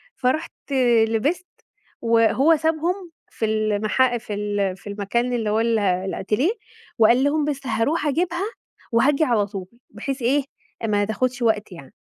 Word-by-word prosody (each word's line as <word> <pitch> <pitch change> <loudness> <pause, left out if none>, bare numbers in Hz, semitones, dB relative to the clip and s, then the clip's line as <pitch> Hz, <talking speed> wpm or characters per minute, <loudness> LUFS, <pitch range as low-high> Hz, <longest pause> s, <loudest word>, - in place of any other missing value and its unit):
فرُوحت 255 +4 0 0.6
لبست 295 +12 -1 0.5
وهو 230 +7 +4
سابهم 330 +4 -1 0.2
في 225 - -3
ال 215 0 0
المحا 240 +4 +2
في 220 - -7
ال 205 -2 -1
في 185 - -14
المكان 215 +5 -1
اللي 225 -3 -1
هو 215 +1 +1
ال 230 -1 +2
الأتيليه 195 - 0 0.5
وقال 235 +4 +5
لهم 295 +1 +1
بس 280 -2 -3
هأروح 245 +9 0
أجيبها 345 +5 0 0.5
وهآجي 275 +6 +3
على 230 -7 +2
طول 195 -2 -6 0.2
بحيث 265 +5 -5
إيه 270 +4 +2 0.4
ما 205 -1 +2
تاخدش 255 +4 -2
وقت 220 -3 +1
يعني. 155 -7 -12
235 Hz, 145 wpm, -22 LUFS, 210-285 Hz, 0.6 s, وقال